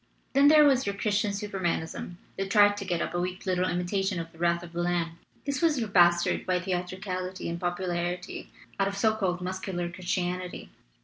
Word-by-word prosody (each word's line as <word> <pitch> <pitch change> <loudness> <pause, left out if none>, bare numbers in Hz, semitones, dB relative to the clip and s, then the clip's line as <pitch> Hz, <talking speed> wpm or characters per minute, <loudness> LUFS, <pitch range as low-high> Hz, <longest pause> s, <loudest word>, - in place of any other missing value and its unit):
"Then 280 +1 +6
there 305 0 +8
was 265 -5 +3
your 200 - -1
Christian 210 +1 +1
Supermanism 190 -4 -3 0.2
that 195 0 -3
tried 205 0 +6
to 200 - -5
get 175 -2 0
up - - -4
a 175 - 0
weak 180 +1 -4
little 185 -1 +1
imitation 185 +1 -1
of 165 0 -6
the 165 - -19
wrath 170 0 +1
of 170 0 -11
the 175 - -2
Lamb. 170 -1 -1 0.3
This 280 -2 -1
was 325 -4 +3
your 225 -3 -2
bastard 175 -2 +4
by 180 -1 +1
theatricality 185 0 -3
and 170 0 -3
popularity 175 0 -3 0.3
out 195 - +3
of 200 0 -3
so 220 +2 +3
called 185 -4 -1
mus 185 +1 -3
cular 175 -3 -3
Christianity. 180 0 -3
185 Hz, 195 wpm, -28 LUFS, 175-200 Hz, 0.3 s, there